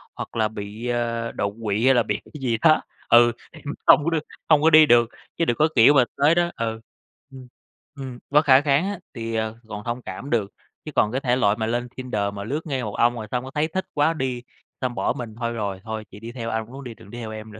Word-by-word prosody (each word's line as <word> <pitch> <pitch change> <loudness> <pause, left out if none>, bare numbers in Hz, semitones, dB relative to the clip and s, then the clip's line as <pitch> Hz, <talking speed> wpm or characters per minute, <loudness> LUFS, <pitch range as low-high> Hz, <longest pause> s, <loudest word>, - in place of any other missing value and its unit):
hoặc - - -7
là 110 -1 +2
bị, 105 +2 -7
a, 115 -1 -1
đột 100 0 -2
quỵ 105 +2 0
hay 135 - +6
là 120 - +3
bị - - -2
cái 150 - -12
gì 120 -3 0
đó, 155 -1 +5 0.3
ừ, 120 0 +7 0.2
em - - -14 0.3
hông - - +7
có 165 - +1
được 160 -2 -1 0.3
hông 155 -2 +6
có 160 - +5
đi 155 -1 +8
được. 120 -4 +4 0.3
Chứ 165 - +2
đừng 120 - 0
có, 155 - +4
kiểu, 125 +4 +7
mà 130 - +6
tới 145 +4 +4
đó 175 0 +1
ừ, 110 -1 -3 0.5
ừm, 130 -1 -11 0.5
ừm, 130 -3 -7
bất 150 +2 +4
khả 130 -1 +7
kháng 145 +3 +2
á, 205 -3 -5
thì, 115 -2 -4
ờ, 110 0 -2
còn 105 -1 -7
thông 120 +1 -3
cảm 95 +6 -7
được, 105 -5 0 0.3
chứ 155 - -6
còn 105 - +3
cái 130 +3 -2
thể 125 -3 +2
loại 105 -5 +2
mà 110 - -1
lên 120 +2 -1
Tinder 105 -6 -2
mà 100 0 -6
lướt 145 +8 -4
ngay 135 -4 -2
một 105 -3 -5
ông 120 +1 +3
rồi 110 -2 -6
xong 125 0 -1
cái 130 - -8
thấy 150 +1 +1
thích 185 +3 -3
quá 150 +2 +2
đi, 130 -5 -3 0.4
xong 125 -2 -2
bỏ - - 0
mình, 115 -3 -7
"Thôi 115 -1 -1
rồi, 100 -4 -3
thôi 110 -1 -5
chị 100 - -11
đi 115 +2 -8
theo 115 -2 -5
ai, 110 0 -1
muốn 135 +5 -10
đi, 120 -3 -7
đừng 100 - -16
đi 120 - -8
theo 110 -2 -6
em 110 0 -8
nữa." 105 - -11
120 Hz, 265 wpm, -23 LUFS, 110-140 Hz, 0.5 s, đi